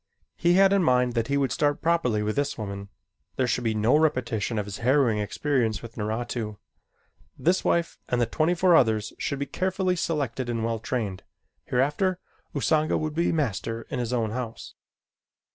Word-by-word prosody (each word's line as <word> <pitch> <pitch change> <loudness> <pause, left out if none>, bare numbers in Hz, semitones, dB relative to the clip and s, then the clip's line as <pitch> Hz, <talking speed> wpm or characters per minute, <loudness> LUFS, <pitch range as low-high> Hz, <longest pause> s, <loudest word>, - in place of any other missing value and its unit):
He 175 0 +3
had 195 +1 +5
in 200 - +4
mind 125 -3 +3
that 115 -1 0
he 140 - +1
would 135 -3 +1
start 145 +2 +1
properly 160 -11 +2
with 105 0 -1
this 145 0 -1
woman. 100 -2 -6 0.5
There 130 - +1
should 125 0 0
be 110 -2 0
no 110 +6 +3
repetition 125 -8 +1
of 105 - -1
his 100 0 -7
harrowing 125 -3 +3
experience 110 0 0
with 115 -1 -9
Naratu. 110 0 -3 0.8
This 180 +3 +2
wife 170 -1 0
and 125 - +1
the 120 - +3
twenty 160 +8 +1
four 180 0 +4
others 110 -6 +2
should 140 - -2
be 140 - -2
carefully 185 +2 0
selected 140 -8 -2
and 115 -1 -1
well 115 -1 -1
trained. 105 -6 -3 0.4
Hereafter 150 +9 +1 0.4
Usanga 155 +2 +2
would 155 -1 -2
be 170 +2 +1
master 115 - -2
in - - -2
his 120 -1 -2
own 115 -3 0
house. 115 -1 -6
125 Hz, 180 wpm, -26 LUFS, 110-155 Hz, 0.8 s, had